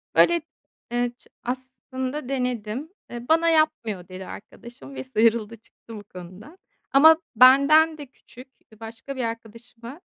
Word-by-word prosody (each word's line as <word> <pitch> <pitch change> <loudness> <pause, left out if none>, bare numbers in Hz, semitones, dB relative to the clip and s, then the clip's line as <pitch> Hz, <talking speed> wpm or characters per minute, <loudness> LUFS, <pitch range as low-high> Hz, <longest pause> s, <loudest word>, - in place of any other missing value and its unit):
Böyle, 340 -1 +4 0.5
eee, 240 0 0
ç - - -24 0.2
aslında 260 +2 -6
denedim, 250 +1 -3 0.2
eee, 240 0 -8
"Bana 330 +1 +4
yapmıyor." 235 - 0
dedi 185 0 -9
arkadaşım 205 - -12
ve 130 - -5
sıyrıldı, 220 - +1
çıktı 225 +1 -15
bu 205 - -9
konuda. 185 - -13 0.3
Ama 315 +4 +7 0.2
benden 280 +6 +6
de 290 - -8
küçük, 255 0 -16 0.2
eee, 220 - -19
başka 230 +5 -9
bir 255 - -3
arkadaşıma 230 - -8
245 Hz, 135 wpm, -24 LUFS, 220-275 Hz, 0.5 s, Ama